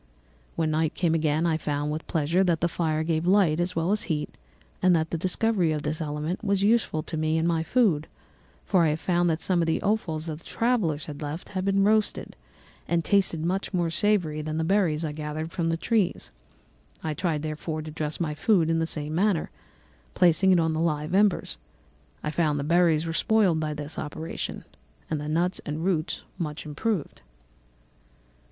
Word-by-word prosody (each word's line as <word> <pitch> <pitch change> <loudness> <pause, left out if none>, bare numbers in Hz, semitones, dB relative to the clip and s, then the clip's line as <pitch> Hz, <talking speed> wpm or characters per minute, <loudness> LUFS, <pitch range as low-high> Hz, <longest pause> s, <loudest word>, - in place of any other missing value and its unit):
When 160 -1 0
night 155 0 0
came 170 -3 +1
again 155 0 +1
I 160 -2 +2
found, 145 -1 -2
with 155 +1 -5
pleasure, 165 +4 +1
that 170 -3 +1
the 170 - +3
fire 160 -2 -1
gave 160 +1 -1
light 185 -5 +4
as 175 +1 -1
well 165 +3 0
as 210 - 0
heat 150 -2 -2 0.5
and 185 -1 +5
that 160 -1 0
the 170 - -1
discovery 185 -1 +1
of 150 -1 -2
this 155 +2 -2
element 155 +5 -3
was 200 -2 +1
useful 205 -8 +2
to 160 - -5
me 155 +1 +1
in 160 - +1
my 165 -1 +1
food, 165 -6 +2 0.6
for 185 -3 +3
I 155 -2 +3
found 175 0 +1
some 175 0 +1
of 165 - 0
the 160 - +1
offals 175 -7 -1
that 155 -2 -5
the - - -22
travellers 200 - 0
had 145 +1 -8
left 150 +3 -5
had 185 -1 -3
been 195 0 +3
roasted, 215 +1 +1 0.5
and 170 0 0
tasted 185 -6 +2
much 190 +2 -1
more 170 -2 0
savoury 170 -5 +1
than 155 +1 -3
the 160 - 0
berries 165 -3 +1
I 155 - -2
gathered 155 +2 -5
from 170 -2 -1
the 165 - 0
trees. 210 0 0 0.7
I 155 - -1
tried, 160 -3 -1
therefore, 155 0 -4
to 155 - -7
dress 150 -1 -3
my 160 -3 -1
food 165 +1 +2
in 165 - +1
the 165 - 0
same 150 -1 -3
manner, 185 0 +1 0.6
placing 180 +2 +5
it 180 - +5
on 160 -1 +1
the 155 - -1
live 155 -1 -1
embers. 200 -1 +2 0.6
I 150 - -2
found 155 -2 +1
that 140 - -2
the 150 - -5
berries 170 -2 +3
were 165 - -3
spoiled 195 -3 +3
by 155 -1 -2
this 150 +1 -4
operation, 155 +2 -5 0.5
and 155 -2 -1
the 150 - -5
nuts 170 +4 0
and 155 +3 -4
roots 175 -3 -1 0.2
much 155 -2 -4
improved. 160 +3 -3
165 Hz, 195 wpm, -26 LUFS, 155-180 Hz, 0.7 s, and